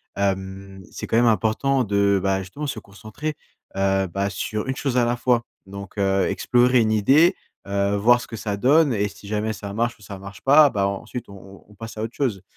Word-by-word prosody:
hem, 95 0 -3
c'est - - -7
quand 115 - +1
même 120 - +4
important 120 +4 +2
de, 100 -1 +2
bah, 95 0 0
justement, 145 +11 -6
se 135 - -4
concentrer, 110 +10 -7 0.4
heu, 95 0 +1
bah, 100 +3 -2
sur 110 +3 -4
une 130 - -2
chose 135 -2 -2
à 120 - +4
la 120 - 0
fois, 120 -1 +1 0.2
donc, 100 +1 -10
heu, 95 -1 +2
explorer 125 0 +3
une 110 -1 +1
idée, 140 - +4 0.3
heu, 100 0 0
voir 120 +4 +4
ce - - -9
que 115 - -7
ça 105 -2 -3
donne 140 +5 +3
et 105 -1 0
si 100 +2 -13
jamais 105 +1 -1
ça 100 -2 -7
marche 115 +2 -1
ou 105 - -19
ça 100 -2 -9
marche 100 -1 -11
pas, 145 +2 +6
bah, 100 -4 0
ensuite 110 +4 -6
on - - -11
on 95 +1 -15
on - - -16
passe 115 +1 -9
à 110 - -3
autre 115 +2 -5
chose. 110 -10 -2
105 Hz, 225 wpm, -23 LUFS, 100-120 Hz, 0.4 s, pas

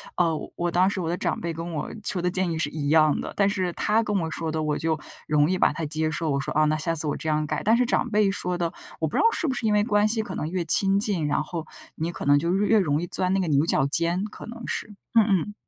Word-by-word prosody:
呃， 170 -2 +2 0.2
我 175 0 -1
当 185 +3 +3
时 190 -2 -3
我 165 - -2
的 175 - -1
长 - - -2
辈 170 0 -2
跟 165 +1 -6
我 150 - -3 0.2
说 180 -4 +3
的 180 0 0
建 185 -1 +1
议 165 - -2
是 160 - -1
一 145 -1 -4
样 155 -1 +4
的。 - - -5
但 200 0 +3
是 185 -3 -1
他 220 +2 +1
跟 210 -2 -1
我 165 -2 -2
说 165 -1 -3
的 155 0 -2
我 150 -1 -1
就 160 0 -1 0.3
容 150 +2 +3
易 185 - +1
把 - - +3
它 160 0 -4
接 155 +1 0
受， 155 +1 -2
我 140 - 0
说， 135 - -4
啊， 155 - +3
那 155 0 +1
下 165 +2 -1
次 155 -1 0
我 145 - -1
这 - - -7
样 155 0 +1
改。 - - -3
但 220 +3 +3
是 245 +1 +2
长 245 - 0
辈 210 -2 +2
说 180 -2 -2
的， 170 -1 -1 0.3
我 160 - +1
不 - - -3
知 - - +4
道 - - +3
是 335 - 0
不 - - 0
是 240 - -3
因 210 - +2
为 210 - +3
关 210 -1 +2
系 220 0 0
可 - - -7
能 155 - -3
越 180 -1 -2
亲 195 +4 +3
近， 200 -7 -1
然 145 +1 0
后 165 -2 -6 0.3
你 160 +2 -3
可 - - -7
能 145 0 +4
就 170 +4 0
越 205 +1 +1
越 220 -1 +5
容 150 -3 +1
易 175 - -4
钻 185 +2 +1
那 195 - +1
个 180 - -2
牛 145 0 +2
角 135 - +2
尖， 170 +6 0
可 210 - -8
能 235 0 -9
是， 210 - -3 0.2
嗯 225 -2 +5
嗯。 200 0 0
170 Hz, 330 characters per minute, -25 LUFS, 155-200 Hz, 0.3 s, 越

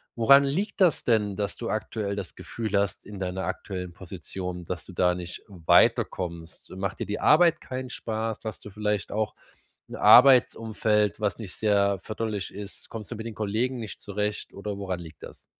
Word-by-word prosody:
Woran 140 +5 +7
liegt 195 +10 -2
das 175 -5 +4
denn, 105 -4 +2
dass 100 -1 -3
du 115 - -4
aktuell 105 -1 -2
das 100 -4 -6
Gefühl 110 -3 -3
hast, 100 -2 -1
in 100 -1 -9
deiner 95 0 -3
aktuellen 95 -1 -5
Position, 90 0 -7
dass 90 -1 -5
du 95 - -11
da 90 0 +3
nicht 90 0 -7
weiterkommst? 85 -2 +1
Macht 95 +1 -4
dir - - -2
die 105 - -3
Arbeit 165 +1 +5
keinen 130 0 -5
Spaß, 110 -2 -3
hast 110 - -6
du - - -7
vielleicht 105 -2 -2
auch 105 0 -1 0.5
'n - - -7
Arbeitsumfeld, 110 -6 +5
was 105 -4 -1
nicht 105 -5 -8
sehr 100 -2 +2
förderlich 110 -3 -4
ist? 100 0 -9
Kommst 110 -2 -8
du 120 - -3
mit 110 - -7
den 115 -2 -6
Kollegen 110 +5 -1
nicht 110 -3 -7
zurecht, 105 +1 -3
oder 100 0 -5
woran 95 -3 -3
liegt 80 -3 -11
das? - - -11
105 Hz, 180 wpm, -26 LUFS, 95-110 Hz, 0.5 s, Woran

